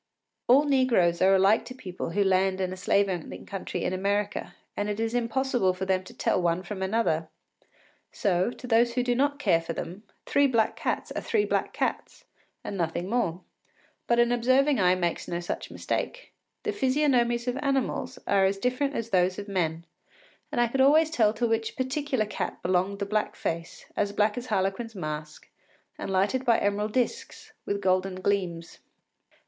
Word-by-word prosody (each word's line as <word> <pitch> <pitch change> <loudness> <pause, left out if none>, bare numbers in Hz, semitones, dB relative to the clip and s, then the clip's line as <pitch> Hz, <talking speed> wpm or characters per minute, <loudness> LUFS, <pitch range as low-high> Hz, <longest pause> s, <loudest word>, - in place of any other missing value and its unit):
All 265 +4 +6
negroes 255 - +2
are 190 +1 +6
alike 195 +4 +4
to 255 - -9
people 185 -9 -6
who 200 +4 +1
land 190 0 +2
in 185 -1 -1
a - - -5
slave 200 +2 +2
owning 180 -4 -5
country 195 -2 -4
in 180 - -1
America, 200 +2 -1 0.2
and 205 0 -2
it 205 +1 -3
is 225 0 -1
impossible 245 -4 +1
for 190 +1 -3
them 185 -1 +1
to - - -12
tell - - +1
one 170 +1 0
from 195 -1 -6
another. 190 -6 0 0.8
So, 185 -1 +1
to 250 - -9
those 235 0 +3
who 250 - +2
do 245 0 +1
not 285 +3 +1
care 170 - +2
for 165 0 -5
them, 180 +4 -6 0.2
three 285 0 +3
black 230 -4 +1
cats - - -2
are - - -3
three 435 -3 +1
black - - -1
cats - - -3 0.4
and - - -5
nothing 175 +1 -2
more. 185 -8 0 0.7
But 235 - +3
an 240 0 +4
observing 260 +3 +3
eye 180 -1 +4
makes 175 -2 -2
no 170 - -2
such 175 - -5
mistake. - - -4 0.3
The 425 - -1
physiognomies 255 -6 +2
of 250 +1 -1
animals 270 -1 -1
are 195 -1 +3
as 195 +1 +1
different 255 +6 -1
as 230 0 -3
those 185 0 +2
of 205 - -6
men, 170 -4 -1 0.7
and - - -1
I 240 - +4
could 265 +3 0
always 310 +4 +5
tell 220 -8 +3
to 235 +2 0
which 225 0 -1
particular 260 -2 -1
cat 210 - -5
belonged 185 +2 +1
the 200 - -2
black 210 +1 -1
face, 165 0 -4
as 205 -1 0
black 210 0 +2
as 245 0 -5
Harlequin’s 210 +2 -1
mask, 155 -3 -6 0.5
and - - -4
lighted 195 +7 +1
by 235 -3 +4
emerald 205 +1 -1
disks 455 - -2
with 200 0 -1
golden 185 0 +1
gleams. 185 -3 -2
210 Hz, 185 wpm, -27 LUFS, 185-250 Hz, 0.8 s, All